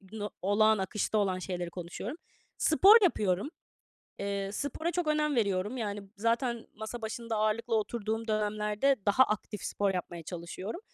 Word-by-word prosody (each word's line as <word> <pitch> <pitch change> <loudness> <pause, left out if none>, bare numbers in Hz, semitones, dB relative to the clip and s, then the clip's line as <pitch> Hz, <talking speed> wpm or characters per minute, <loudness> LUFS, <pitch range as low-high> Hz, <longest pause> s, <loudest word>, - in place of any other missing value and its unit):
Bunu 205 +1 -6
olağan, 215 +2 +4
akışta 210 +2 -1
olan 190 -3 +1
şeyleri 180 -2 -4
konuşuyorum. 180 - -6 0.4
Spor 390 +7 +7
yapıyorum. 205 - +2 0.7
Eee, 200 0 -2
spora 285 +8 -2
çok 355 -3 -1
önem 300 -2 +1
veriyorum. 205 +2 0
Yani 205 -3 -3
zaten 235 +2 0
masa 220 +2 -6
başında 225 0 -3
ağırlıklı 220 +2 +1
oturduğum 220 +1 -3
dönemlerde 215 +5 +1
daha 230 +6 +6
aktif 210 -1 -4
spor 200 -2 0
yapmaya 175 -1 -4
çalışıyorum 180 - -6
215 Hz, 135 wpm, -30 LUFS, 195-235 Hz, 0.7 s, Spor